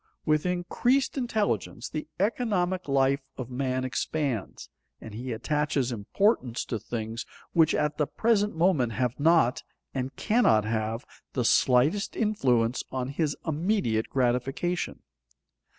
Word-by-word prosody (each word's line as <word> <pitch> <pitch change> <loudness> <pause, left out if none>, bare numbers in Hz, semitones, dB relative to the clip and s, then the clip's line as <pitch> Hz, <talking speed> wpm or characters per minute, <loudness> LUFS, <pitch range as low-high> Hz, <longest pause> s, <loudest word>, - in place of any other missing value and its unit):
With 155 +2 +2
increased 240 +10 +1
intelligence 220 - -1
the 155 0 -5
economic 190 -5 0
life 135 0 +3 0.2
of 130 -1 -6
man 130 0 -1
expands, 130 -3 -2 0.3
and 110 - -10
he 125 +4 -5
attaches 145 +2 0
importance 125 - 0
to 115 - -3
things 115 +1 -4 0.3
which 160 -2 +4
at 150 +1 0
the 150 - +2
present 210 -3 +1
moment 160 -9 +2
have 125 +2 -1
not, 160 -5 +4 0.3
and 130 0 -3
cannot 115 - +3
have, 110 +1 -2 0.3
the 125 -3 0
slightest 135 - +3
influence 130 - +1
on 130 -1 -2
his 145 +1 -1
immediate 160 - 0
gratification. 135 +7 -1
140 Hz, 120 wpm, -27 LUFS, 125-180 Hz, 0.3 s, which